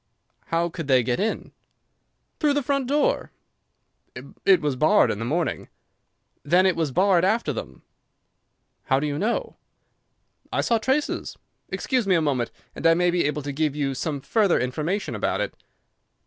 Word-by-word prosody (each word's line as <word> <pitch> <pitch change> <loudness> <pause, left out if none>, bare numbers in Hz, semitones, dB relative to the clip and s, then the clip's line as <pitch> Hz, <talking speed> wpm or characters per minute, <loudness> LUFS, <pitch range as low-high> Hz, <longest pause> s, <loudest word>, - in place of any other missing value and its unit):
"How 165 +1 +1
could 165 -3 -6
they 130 -3 +4
get 120 +1 -1
in?" 215 +3 -2 0.9
"Through 295 -3 +2
the 290 - 0
front 275 0 0
door." 300 - +1 1.2
"It 190 -2 +7
was 145 -3 -1
barred 155 +10 +4
in 105 - -4
the 115 - -3
morning." 160 +7 -2 0.7
"Then 180 +5 +3
it 185 - +3
was 160 -4 -1
barred 185 +3 +3
after 195 -5 +1
them." 70 - -8 1.0
"How 135 - +2
do 145 - -2
you 145 0 -2
know?" 225 +4 -2 0.9
"I - - +1
saw 230 - +2
their - - -11
traces. 280 +3 -1 0.3
Excuse 255 -6 -1
me 185 - +4
a - - +3
moment, 135 -6 0 0.3
and 165 - +1
I 165 - +5
may 175 0 +2
be 175 -2 +1
able 150 0 -1
to 145 - -4
give 150 0 -1
you 140 -2 -1
some 145 +1 -3
further 205 +2 +2
information 155 +11 -2
about - - -1
it." - - -2
165 Hz, 170 wpm, -24 LUFS, 145-205 Hz, 1.2 s, It